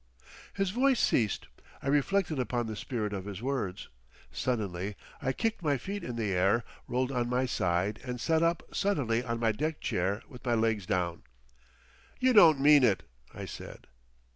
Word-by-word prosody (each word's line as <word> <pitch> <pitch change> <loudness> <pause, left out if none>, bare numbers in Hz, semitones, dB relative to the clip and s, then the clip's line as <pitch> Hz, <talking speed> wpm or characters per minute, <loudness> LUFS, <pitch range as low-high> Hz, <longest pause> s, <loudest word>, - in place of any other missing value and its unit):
His 195 -2 0
voice 260 +3 +3
ceased. 110 -5 +1 0.4
I - - -4
reflected 155 +3 +1
upon 120 -1 -1
the 110 -1 -4
spirit 105 -2 -3
of 95 -2 -4
his 100 -2 -6
words. 115 -7 -3 0.4
Suddenly 100 -5 -2 0.3
I 130 - 0
kicked 225 - -1
my 145 -4 +1
feet 200 +10 -5
in 120 - -4
the 110 -4 -1
air, 95 +6 +3 0.2
rolled 130 +2 0
on 120 -2 -1
my 125 +1 +1
side 95 -3 0
and 125 -1 -4
sat 160 +4 +2
up 165 0 +1
suddenly 125 - +1
on 115 -1 -3
my 115 -1 +2
deck 155 +8 -2
chair 95 +4 -1
with 125 -4 -13
my 120 -2 +1
legs 110 -4 0
down. 85 -2 -1 1.0
"You 255 0 +4
don't 165 - +8
mean 145 0 +7
it!" 105 -6 +3 0.3
I - - -7
said. - - -9
125 Hz, 170 wpm, -30 LUFS, 105-150 Hz, 1.0 s, don't